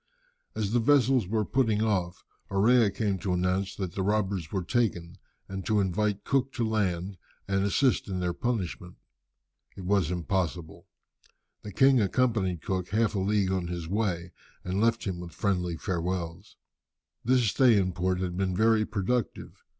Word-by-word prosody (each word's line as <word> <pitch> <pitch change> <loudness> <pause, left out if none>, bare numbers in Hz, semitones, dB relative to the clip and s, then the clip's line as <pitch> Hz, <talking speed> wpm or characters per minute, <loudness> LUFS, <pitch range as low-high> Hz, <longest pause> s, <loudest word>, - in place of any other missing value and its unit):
As 105 -2 -2
the 120 - +3
vessels 130 -3 +3
were 110 +1 0
putting 110 -4 +1
off, 95 -5 -1 0.2
Orea 110 +3 +4
came 100 -1 -1
to 90 0 -2
announce 90 +2 0
that 95 -4 -4
the 95 - -3
robbers 95 -4 -1
were 95 -2 -2
taken, 90 -5 -1 0.3
and 95 0 -5
to 105 -1 +2
invite 100 +2 0
Cook 135 -1 0
to 120 -4 -1
land 95 -3 -1 0.3
and 95 0 +1
assist 120 +6 +2
in 95 -2 -3
their 90 -1 -1
punishment. 90 -5 -3 0.8
It 95 - -7
was 95 -4 +2
impossible. 90 -2 -3 0.7
The 105 - -8
king 135 +2 +4
accompanied 100 -5 0
Cook 90 -2 -2
half 110 +3 +1
a 100 - -1
league 100 0 +1
on 95 -2 -1
his 85 -2 -5
way, 90 -3 -2 0.3
and 95 +3 -2
left 115 0 +2
him 95 -3 -3
with 85 -2 -8
friendly 90 -1 -1
farewells. 90 +1 -4 0.7
This 125 0 +3
stay 120 +1 +5
in 95 -2 +1
port 90 +1 -1
had 90 -1 -3
been 95 -1 -1
very 110 +1 +3
productive. 110 +3 -3
95 Hz, 160 wpm, -28 LUFS, 90-110 Hz, 0.8 s, stay